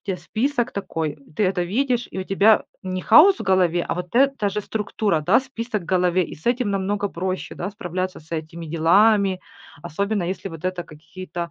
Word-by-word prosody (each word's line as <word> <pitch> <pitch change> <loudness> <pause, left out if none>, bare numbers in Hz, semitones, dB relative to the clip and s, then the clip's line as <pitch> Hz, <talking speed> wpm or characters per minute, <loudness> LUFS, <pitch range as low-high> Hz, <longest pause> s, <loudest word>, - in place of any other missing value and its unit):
тебя 190 - 0
список 240 +8 -1
такой, 165 -6 -3
э, - - -24 0.2
ты - - +1
это 185 -1 +1
видишь, 245 +5 0
и - - -6
у 185 - -3
тебя 205 +3 +4 0.2
не 185 -1 -4
хаос 380 +5 +7
в - - -5
голове, 180 -3 +2
а - - -2
вот 180 +2 -6
эта 270 -4 +3
же 205 +2 -3
структура, 210 -4 -1
да, 150 - +4
список 230 -5 -5
в - - -12
голове. 180 -1 +2
И - - -9
с 155 - -20
этим 240 -2 +1
намного 200 +1 -1
проще, 185 +1 -4
да, 180 - -3
справляться 185 -3 -4
с 155 - -22
этими 165 +1 -5
делами, 190 +4 +3 0.4
особенно, 200 +7 -2
если 185 +2 -4
вот 165 -1 -10
это 185 -1 -2
какие-то 170 +2 -8
190 Hz, 200 wpm, -22 LUFS, 175-215 Hz, 0.4 s, хаос